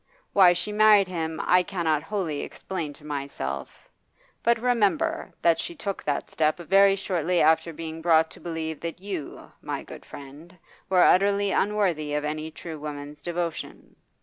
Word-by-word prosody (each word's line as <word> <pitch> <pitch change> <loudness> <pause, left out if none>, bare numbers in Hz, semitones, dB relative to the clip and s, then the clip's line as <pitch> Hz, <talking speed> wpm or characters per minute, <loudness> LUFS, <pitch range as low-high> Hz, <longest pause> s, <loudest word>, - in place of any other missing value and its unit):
Why 185 -3 +7
she 180 +4 -3
married 210 -2 +5
him 160 -3 -3
I 180 0 +5
cannot 170 -5 -1
wholly 180 -8 -3
explain 170 -6 -5
to 150 - -17
myself, 135 - -5 0.5
but 235 0 +3
remember 250 +8 +1
that 170 -1 +4
she 345 - -4
took 200 -10 -4
that 145 -1 -2
step 155 -1 +1
very 195 +3 +4
shortly 180 -3 0
after 160 +2 +3
being 160 0 -7
brought 160 -1 +3
to - - -12
believe 160 -2 -4
that 170 0 -6
you, 190 -6 -7
my - - -4
good - - -11
friend, 145 +6 -12 0.3
were 185 -2 +5
utterly 200 +1 +4
unworthy 180 -9 0
of 150 0 -1
any 155 +1 -3
true 160 0 -8
woman's 145 0 -7
devotion. 170 0 -5
170 Hz, 155 wpm, -26 LUFS, 155-195 Hz, 0.5 s, Why